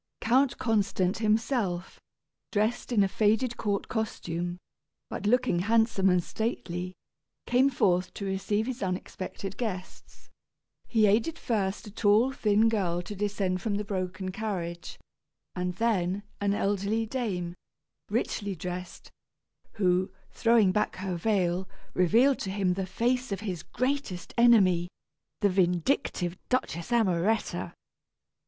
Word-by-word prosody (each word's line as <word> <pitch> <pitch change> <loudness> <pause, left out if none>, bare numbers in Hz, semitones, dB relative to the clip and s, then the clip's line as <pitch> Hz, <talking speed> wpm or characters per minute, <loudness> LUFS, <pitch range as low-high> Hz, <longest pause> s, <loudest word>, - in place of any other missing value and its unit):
Count 255 +3 +3
Constant 200 -4 +1
himself, 215 -4 0 0.5
dressed 215 +4 0
in 215 -4 +4
a - - +3
faded 220 +5 +1
court 200 -2 -1
costume, 175 -6 -3 0.5
but - - -3
looking 230 -6 +3
handsome 225 -1 +3
and 180 -1 +3
stately, 185 -5 -3 0.5
came 255 +3 +4
forth 185 -8 +1
to 200 - -4
receive 195 +3 0
his 255 0 -4
unexpected 190 0 -4
guests. 190 -6 -6 0.6
He 220 -2 +3
aided 225 +11 +2
first 205 -7 -1
a 210 - -9
tall 215 +5 +3
thin 215 -3 +3
girl 180 -6 0
to 205 - -7
descend 195 -2 -1
from 215 -3 -1
the 205 - -1
broken 185 -1 -3
carriage, 180 -5 -4 0.6
and 180 0 -2
then, 200 -3 0 0.2
an 200 0 +1
elderly 205 +3 0
dame, 205 -8 -3 0.6
richly 205 -2 -1
dressed, 180 +1 -7 0.6
who, 185 -1 +2 0.2
throwing 225 -5 +4
back 210 +3 0
her 185 -1 -3
veil, 185 -1 0 0.2
revealed 230 +10 +4
to 190 - -3
him 190 -2 +1
the 190 0 -3
face 245 +5 0
of 195 - -2
his 185 -7 -4
greatest 255 -10 -3
enemy 195 -8 +5 0.5
the 205 - +4
vindictive 180 - +1
Duchess 245 -9 -1
Amoretta. 215 -2 +1
200 Hz, 125 wpm, -28 LUFS, 180-225 Hz, 0.6 s, enemy